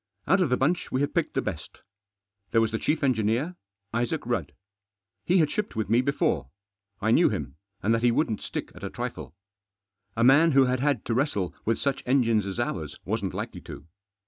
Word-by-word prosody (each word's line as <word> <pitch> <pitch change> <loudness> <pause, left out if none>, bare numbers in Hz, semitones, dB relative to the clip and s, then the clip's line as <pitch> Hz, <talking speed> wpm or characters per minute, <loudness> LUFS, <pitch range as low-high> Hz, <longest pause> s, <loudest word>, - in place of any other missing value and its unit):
Out 195 - +3
of 175 - +2
the 125 - +2
bunch 175 +7 0
we 130 - 0
had 145 - -1
picked - - -1
the - - +1
best. - - -6 0.7
There 115 - +3
was 115 -1 +2
the 110 - -2
chief 155 0 0
engineer, 125 +6 +1 0.4
Isaac 120 +6 -1
Rudd. 95 - -2 0.7
He 180 - +3
had 155 -4 +3
shipped 210 -1 -3
with 110 -1 -2
me 120 +2 +5
before. 90 - 0 0.5
I 110 +2 +1
knew - - +5
him, 65 - -4 0.3
and 110 - +3
that 115 - +1
he 120 - +4
wouldn't 115 -3 0
stick - - -5
at - - -13
a - - -3
trifle. 70 - -6 0.8
A 115 - +2
man 145 +6 +6
who 135 -1 +6
had 125 0 0
had 140 -4 0
to 115 - -1
wrestle 115 - 0
with 115 +1 +1
such 140 -1 -1
engines 115 -6 +2
as 95 +4 -4
ours 85 -11 -3
wasn't - - -2
likely - - -5
to. - - -10
120 Hz, 200 wpm, -27 LUFS, 110-140 Hz, 0.8 s, man